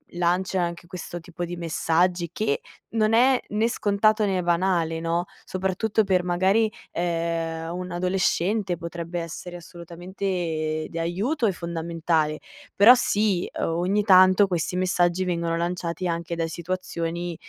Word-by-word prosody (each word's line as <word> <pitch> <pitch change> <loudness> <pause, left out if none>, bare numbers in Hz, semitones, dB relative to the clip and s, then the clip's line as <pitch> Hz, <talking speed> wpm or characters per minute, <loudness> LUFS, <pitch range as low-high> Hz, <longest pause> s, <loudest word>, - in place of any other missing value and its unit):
lancia 180 +2 +1
anche 170 0 -3
questo 175 0 -7
tipo 175 +1 -7
di 175 0 -4
messaggi, 170 +1 0
che 140 -10 -1 0.3
non 220 -1 +1
è 250 +2 +5
né 215 +2 +1
scontato 215 -1 +2
né 185 -2 0
banale, 170 -2 +1
no, 165 +1 -1 0.2
soprattutto 190 +4 0
per 185 -3 +2
magari, 190 +5 +2 0.2
ehm, 165 -1 -2
un 180 0 -5
adolescente 185 +2 0
potrebbe 170 +1 -5
essere 170 +1 -7
assolutamente 170 -2 -4
di 165 - -6
aiuto 210 - 0
e - - +2
fondamentale. 165 -2 -1 0.4
Però 215 +5 +9
sì, 205 -6 +1
uhm, - - -1
ogni 180 +5 +1
tanto 185 0 +6
questi 180 -1 -2
messaggi 180 0 +1
vengono 170 -2 -1
lanciati 175 +1 -2
anche 170 0 -3
da 165 0 -1
situazioni 170 0 -4
175 Hz, 135 wpm, -25 LUFS, 170-190 Hz, 0.4 s, Però